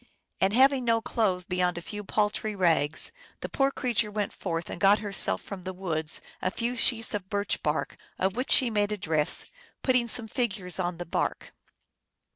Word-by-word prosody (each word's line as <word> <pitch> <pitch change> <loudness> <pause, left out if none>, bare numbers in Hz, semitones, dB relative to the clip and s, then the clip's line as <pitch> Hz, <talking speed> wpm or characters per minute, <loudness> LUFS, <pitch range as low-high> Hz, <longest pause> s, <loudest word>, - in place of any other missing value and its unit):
And 190 - +3
having 265 +2 +5
no 230 -1 +3
clothes 195 -5 0
beyond 180 -1 0
a - - -4
few 210 +2 -6
pal 210 +1 +1
try 215 0 -4
rags, 165 -5 +2 0.3
the - - -4
poor 270 0 +2
creature 235 -5 0
went 210 -1 -2
forth 165 -3 -3
and - - -7
got 200 +1 +6
herself 195 - +1
from 190 -2 -8
the 185 +1 -5
woods 160 -4 -1 0.2
a 185 - +1
few 235 +5 -2
sheets 230 -2 +2
of 195 -2 -4
birch 205 0 -1
bark, - - -1 0.2
of 190 +1 0
which 255 +3 -2
she 250 -3 +6
made 205 -1 +1
a 210 - -1
dress, 155 -5 +1 0.4
putting 250 -2 +2
some 230 0 0
figures 205 -7 -3
on 175 -1 -1
the 175 - -5
bark. - - -2
205 Hz, 190 wpm, -28 LUFS, 180-230 Hz, 0.4 s, got